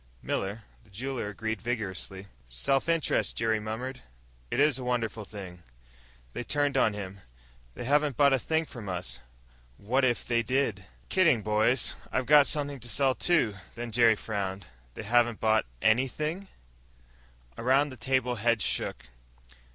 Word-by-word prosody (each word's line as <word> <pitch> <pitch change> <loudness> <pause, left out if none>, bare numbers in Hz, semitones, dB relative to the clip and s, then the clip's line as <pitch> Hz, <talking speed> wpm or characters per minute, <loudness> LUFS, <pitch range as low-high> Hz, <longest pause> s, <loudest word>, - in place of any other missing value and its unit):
Miller, 100 +4 -2 0.2
the 110 - -24
jeweler, 120 +2 -4
agreed 110 0 -4
vigorously. 100 -4 -3 0.2
"Self 65 - 0
interest," 165 -2 +1
Jerry 110 -1 +1
murmured, 115 +5 -5 0.5
"is 140 0 +3
a - - -5
wonderful 115 -3 -2
thing." 95 -4 -9 0.7
They - - -4
turned 145 +2 0
on 110 -5 +3
him. 100 -1 -7 0.6
"They - - -6
haven't 145 +1 +2
bought 140 -1 +5
a 135 - +3
thing 160 +5 0
from 115 -9 -8
us! 65 -10 -4 0.6
And - - -20
what 130 +4 +2
if 120 -2 +1
they 120 -1 +2
did?" 115 -5 -1 0.2
"Kidding, 155 - +3
boys. 110 +4 +2 0.2
I've 130 - 0
got 145 0 +7
something 145 -2 -2
to 120 0 -7
sell, 135 +4 +2
too." 155 -9 +2 0.2
Then 120 0 -5
Jerry 115 0 +5
frowned. 100 -3 -4 0.3
"They - - -6
haven't 120 +1 +2
bought 110 - +2 0.2
anything?" 150 - +1 1.1
Around 135 - +2
the 130 - -9
table, 130 -2 0
heads 115 0 +2
shook. - - -1
120 Hz, 150 wpm, -29 LUFS, 105-135 Hz, 1.1 s, got